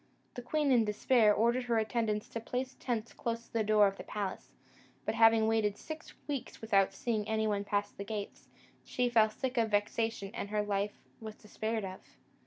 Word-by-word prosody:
The 245 - -6
queen, 290 +3 +1
in 240 -3 +5
despair, 215 +1 +3
ordered 235 +4 +2
her 235 -2 +1
attendants 220 -1 0
to 230 - -4
place 255 +3 -4
tents 235 -2 -3
close 230 0 -3
to - - -27
the 225 -1 +1
door 210 0 +5
of 195 0 0
the - - -7
palace; 200 -3 -4 0.6
but, - - 0
having 225 -1 +5
waited 220 -2 +1
six 315 0 -8
weeks 275 -4 -4
without 200 -4 +3
seeing 215 +1 -2
any 220 0 0
one 205 -2 0
pass 205 0 -1
the 200 - -7
gates, 205 -1 -6 0.4
she 250 -1 0
fell 220 -2 +5
sick 255 +4 -4
of 225 -1 +2
vexation, 205 0 0
and 230 -3 -4
her 210 0 0
life 205 0 -1 0.2
was 220 -1 -8
despaired 220 0 -3
of. 185 0 -7
220 Hz, 195 wpm, -32 LUFS, 210-235 Hz, 0.6 s, in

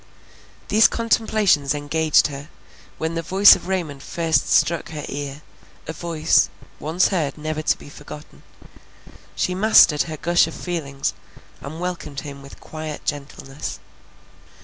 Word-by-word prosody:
These 220 +2 +6
contemplations 215 - +1
engaged 155 +2 +2
her, 145 +1 -5 0.5
when 160 +1 -3
the 165 - -2
voice 190 +4 +7
of - - -9
Raymond 165 -8 -3
first 160 -3 0
struck 170 -1 +2
her 150 -2 -6
ear, 145 +1 -6 0.4
a 160 - -5
voice, 165 -1 +2 0.3
once 165 +5 +1
heard, 160 -8 -1
never 155 0 -3
to - - +1
be - - -13
forgotten; 145 - -12 0.9
she 180 - 0
mastered 185 -6 +5
her 155 - -5
gush 175 +2 +3
of 165 - -8
feelings, 140 -6 -3 0.5
and 155 +4 -8
welcomed 170 -6 -5
him 140 -2 -9
with 140 - -13
quiet 155 -1 -7
gentleness. 140 -1 -5
155 Hz, 135 wpm, -22 LUFS, 145-175 Hz, 0.9 s, voice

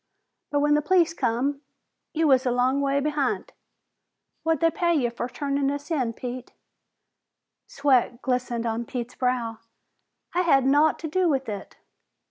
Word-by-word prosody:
But 290 0 +1
when 295 0 +3
the 300 - +3
police 335 +1 +3
come, 275 +1 -1 0.5
you 320 0 +1
was 260 -2 +4
a - - +3
long 255 +3 +2
ways 280 0 +1
behin't. 295 -2 -1 0.9
What'd 325 -2 +1
they 330 0 +2
pay 345 -2 +2
you 245 -6 +1
fer 240 +1 -4
turnin' 280 +1 -1
us 285 +3 -5
in, 255 -7 0
Pete?" 250 +1 -7 1.1
Sweat 260 -4 +1
glistened 250 -2 -1
on 230 +1 -2
Pete's 240 0 -5
brow. 245 -3 -1 0.7
"I 360 - +2
had 275 -7 +3
naught 290 +3 +4
to 325 - -3
do 360 +3 +1
with 270 -3 0
it!" 205 -3 -7
275 Hz, 155 wpm, -25 LUFS, 245-300 Hz, 1.1 s, was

